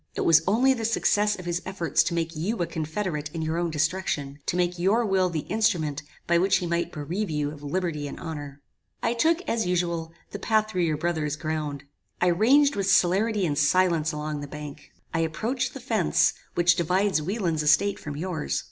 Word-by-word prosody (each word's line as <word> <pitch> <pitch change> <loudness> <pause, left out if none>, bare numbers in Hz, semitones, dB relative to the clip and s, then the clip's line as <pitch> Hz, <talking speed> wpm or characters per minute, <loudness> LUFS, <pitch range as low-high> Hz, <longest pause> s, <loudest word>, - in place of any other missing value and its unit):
It - - -2
was 165 -1 +5
only 250 +7 +4
the 230 -3 -5
success 210 -2 +2
of 180 - -9
his 175 0 -1
efforts 185 -3 0
to 170 - -1
make 165 0 -2
you 190 +9 -2
a 175 - 0
confederate 155 -1 -3
in 160 - -2
your 160 +2 -1
own 175 -1 0
destruction, 150 -3 -1
to - - 0
make 180 0 0
your 210 +7 +2
will 190 -2 +2
the 160 -3 -2
instrument 170 -10 0 0.2
by 170 0 +3
which 190 +2 +3
he 180 - -3
might 170 0 -1
bereave 175 +7 -3
you 150 -1 -1
of 145 -1 -11
liberty 150 -1 -2
and - - -8
honor. 145 -4 -7 0.4
"I 230 - +2
took, 325 +8 +2
as 230 - -1
usual, 170 -2 -1 0.2
the 200 - -6
path 215 0 +1
through 180 -4 +1
your 155 -2 0
brother's 155 -2 -1
ground. 155 -3 -4 0.4
I 180 - +3
ranged 270 +11 +4
with 195 -1 0
celerity 200 +3 +3
and 150 -4 0
silence 160 +1 +2
along 150 -1 -4
the 145 - -6
bank. 150 0 -9 0.2
I 165 - 0
approached 220 +11 -2
the - - -6
fence, - - +2 0.2
which 175 0 +4
divides 180 +1 +1
Wieland's 175 -2 -1
estate 160 +7 +3
from 145 -1 -6
yours. 165 -2 -2
170 Hz, 200 wpm, -26 LUFS, 155-195 Hz, 0.4 s, was